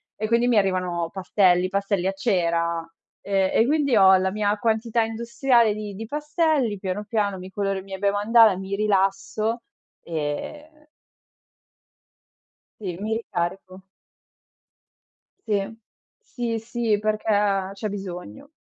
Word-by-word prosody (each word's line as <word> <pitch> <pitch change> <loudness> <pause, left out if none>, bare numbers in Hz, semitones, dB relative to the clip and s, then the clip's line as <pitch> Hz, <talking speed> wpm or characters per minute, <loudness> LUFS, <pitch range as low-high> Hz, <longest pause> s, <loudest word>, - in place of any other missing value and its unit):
e 215 - -3
quindi 235 +2 +2
mi 240 -3 +3
arrivano 180 -4 0
pastelli, 185 -1 +2
pastelli 195 -1 -1
a 195 - 0
cera, 170 -3 0 0.4
ehm, 195 -1 +1
e 225 - +3
quindi 280 -3 +2
ho 190 -1 +7
la 190 0 +1
mia 205 0 0
quantità 225 +1 0
industriale 235 +1 +2
di 210 -1 -6
di 220 +3 -6
pastelli, 295 - 0
piano, 190 +1 -3
piano, 205 -2 -1
mi 185 +1 -9
coloro 195 0 -2
i - - -10
miei 190 -1 -8
bei 200 0 +2
mandala, 215 +1 +5
mi 195 +1 -4
rilasso 210 +3 0 0.4
e 295 - -5 1.9
Sì, 180 -5 -5
mi 215 +2 -2
ricarico. 185 -2 -4 1.7
Sì, 205 +1 -1 0.4
sì, 240 - -3
sì, 225 -1 -1
perché 205 -2 0
c'è 210 +2 -4
bisogno. 195 +7 -7
205 Hz, 125 wpm, -24 LUFS, 190-225 Hz, 1.9 s, ho